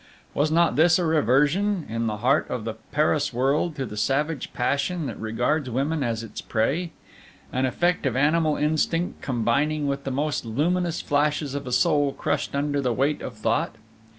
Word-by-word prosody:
Was 145 +2 +1
not 165 0 +2
this 160 +2 +5
a 180 - 0
reversion, 160 - +2
in 115 +1 -2
the 105 -1 -2
heart 130 +7 +2
of 125 -3 -3
the 115 0 -3 0.2
Paris 150 -1 +1
world, 140 +6 +1
to 135 -2 -3
the 105 - -8
savage 135 +7 -1
passion 140 +6 -1
that - - -5
regards 120 +6 -1
women 140 +6 -1
as 115 -3 -1
its 115 - -7
prey, 145 +11 0 0.6
an 130 +1 +1
effect 175 +3 0
of 125 - -1
animal 155 +3 +2
instinct 160 +3 0
combining 140 +5 0
with 140 0 -2
the - - -3
almost 145 +3 -1
luminous 165 +9 0
flashes 145 -1 0
of 140 -1 -4
a - - -4
soul 145 0 +2
crushed - - -2
under 145 0 0
the 125 -2 0
weight 140 +5 0
of 120 - -6
thought? 115 +1 -1
145 Hz, 180 wpm, -25 LUFS, 125-155 Hz, 0.6 s, this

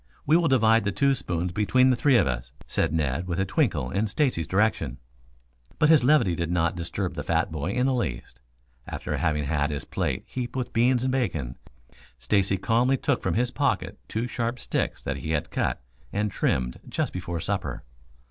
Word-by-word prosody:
We 155 - +4
will 170 -1 +4
divide 115 -4 +4
the 100 - 0
two 140 +6 +2
spoons 90 -7 -2
between 130 +7 +3
the - - +3
three 130 +1 +4
of - - +4
us," - - -3
said - - 0
Ned, 75 +1 -1
with 85 0 -2
a 95 - +2
twinkle 90 - 0
in 100 +4 0
Stacy's 105 - 0
direction. 95 - +1 0.8
But 150 -1 +4
his 155 -6 +6
levity 135 - +4
did 85 0 -2
not 85 -1 +1
disturb 85 -1 -3
the - - -4
fat - - 0
boy 80 +4 -3
in 125 0 +1
the 135 - +2
least. 60 - -3 0.5
After - - -4
having 75 -2 0
had 75 0 0
his 75 -2 -4
plate - - -2
heaped 125 -1 -5
with 125 -2 -3
beans 120 +2 +3
and 130 - +1
bacon, 80 - -1 0.6
Stacy 95 +10 +1
calmly 120 +7 +2
took 140 -2 0
from - - -1
his 120 +2 +1
pocket - - -1
two 110 +2 -2
sharp 120 0 -2
sticks - - -2
that 70 0 -2
he 80 +4 -3
had 75 - -2
cut - - -1 0.3
and 105 0 -1
trimmed 60 -7 -1
just - - -2
before 85 -2 -4
supper. - - -3
100 Hz, 195 wpm, -26 LUFS, 80-125 Hz, 0.8 s, his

